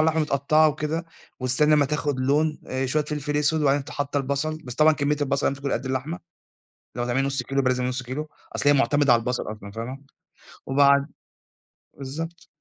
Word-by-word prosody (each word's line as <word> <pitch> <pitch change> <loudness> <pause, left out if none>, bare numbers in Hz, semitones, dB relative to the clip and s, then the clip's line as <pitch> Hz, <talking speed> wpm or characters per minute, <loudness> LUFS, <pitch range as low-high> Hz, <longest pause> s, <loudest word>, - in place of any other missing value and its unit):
اللحمة 160 0 +3
متقطّعة 150 +2 +3
وكده، 155 +2 -2 0.4
وتستني 130 +4 +3
أمّا 145 -1 +4
تاخُد 145 -2 -1
لون، 150 +4 +1
آآ 130 +1 -2
شوية 150 +3 0
فلفل 150 -1 -3
أسود 150 +2 +2
وبعدين 140 -1 +2
ت - - -11
حاطّة 145 0 -3
البَصَل، 140 +3 -1
بس 125 - -7
طبعًا 155 +3 +5
كمّية 145 0 0
البَصَل 140 0 0
لازم 140 0 -4
تكون 140 -1 -2
قد 135 - -2
اللحمة. 135 +6 -3 0.8
لو 120 - -1
هتعملي 125 +2 0
نُص 135 -2 -2
كيلو 135 +2 -1
يبقى 130 - +2
لازم 125 0 -1
نُص 125 0 -2
كيلو، 145 +5 -5 0.3
أصل 145 - +2
هي 145 - +7
مُعتمدة 145 -1 +4
على 120 - +4
البَصَل 125 +2 -2
أصلًا، 100 -2 -9
فاهمة؟ 115 +5 -5 0.7
وبعد 140 +1 +4 0.9
بالضبط. 160 +5 -6
140 Hz, 190 wpm, -24 LUFS, 130-150 Hz, 0.9 s, هي